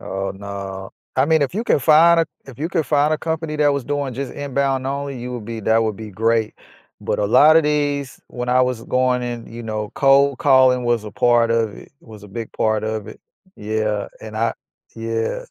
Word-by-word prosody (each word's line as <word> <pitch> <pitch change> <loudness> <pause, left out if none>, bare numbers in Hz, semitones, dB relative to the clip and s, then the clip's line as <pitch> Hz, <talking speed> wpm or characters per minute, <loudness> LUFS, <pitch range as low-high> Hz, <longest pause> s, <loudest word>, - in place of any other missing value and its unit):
Oh, 95 0 -4
no, 95 -1 -7 0.3
I 130 - +4
mean 160 0 +3
if 140 - -2
you 225 +3 -2
can - - +3
find 165 +4 +5
a 165 - 0 0.2
if 135 -4 -13
you 160 +4 -2
could 165 -4 0
find 145 +3 +2
a - - -5
company 160 -1 -3
that 145 -1 +3
was 140 -3 -2
doing 145 -2 -2
just 135 +1 -5
inbound 140 -2 -1
only, 140 -1 -4
you 125 +1 -6
would 120 -3 -6
be 115 -1 -5
that 110 +2 +2
would 110 -3 -2
be 110 -1 -8
great, 110 +2 0 0.5
but, - - -2
a - - +1
lotta 155 +8 +6
these 145 -2 -1
when 125 0 -5
I 125 +1 +4
was 125 -3 -1
going 125 -1 +1
in, 120 -1 -5
you 120 +1 -7
know, 110 -1 -4
cold 140 -1 +4
calling 130 -3 +4
was 120 -2 0
a 105 - -7
part 120 0 +2
of 115 -2 0
it, - - -14
was 110 -3 -14
a 105 - -12
big 115 +3 -7
part 110 -1 0
of 110 -1 -4
it, - - -12 0.4
yeah, 105 -1 -2
and 110 0 -8
I, 115 +1 +1 0.4
yeah. 115 0 -3
125 Hz, 215 wpm, -20 LUFS, 110-140 Hz, 0.5 s, lotta